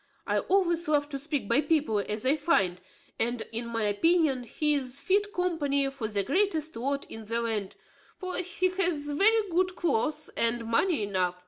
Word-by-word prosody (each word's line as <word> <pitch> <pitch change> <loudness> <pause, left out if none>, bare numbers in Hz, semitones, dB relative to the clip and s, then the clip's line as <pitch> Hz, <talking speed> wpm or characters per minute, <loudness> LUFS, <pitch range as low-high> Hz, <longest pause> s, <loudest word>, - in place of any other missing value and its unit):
I - - +1
always 345 -3 +1
love 290 -1 +1
to 275 -2 -4
speak 290 -5 -2
by 235 +6 +3
people 300 -10 +1
as 210 +3 -3
I 270 +3 +4
find; 200 - +1 0.4
and, 240 +1 -1
in 230 +1 -4
my 230 -1 -2
opinion, 270 - +2
he 300 +6 +1
is 270 -2 -1
fit 405 +7 +1
company 300 -7 0
for 265 -5 -4
the 205 -2 -1
greatest 320 - +1
lord 275 +4 -2
in 225 -1 -9
the 230 +2 -1
land; 220 -4 -2 0.4
for 370 -1 -4
he 365 0 0
hath 335 -6 -1
very 430 +4 +4
good 365 +2 +1
cloaths, 305 -3 0
and 230 0 0
money 230 - +1
enough. 185 -3 0
285 Hz, 180 wpm, -28 LUFS, 230-340 Hz, 0.4 s, I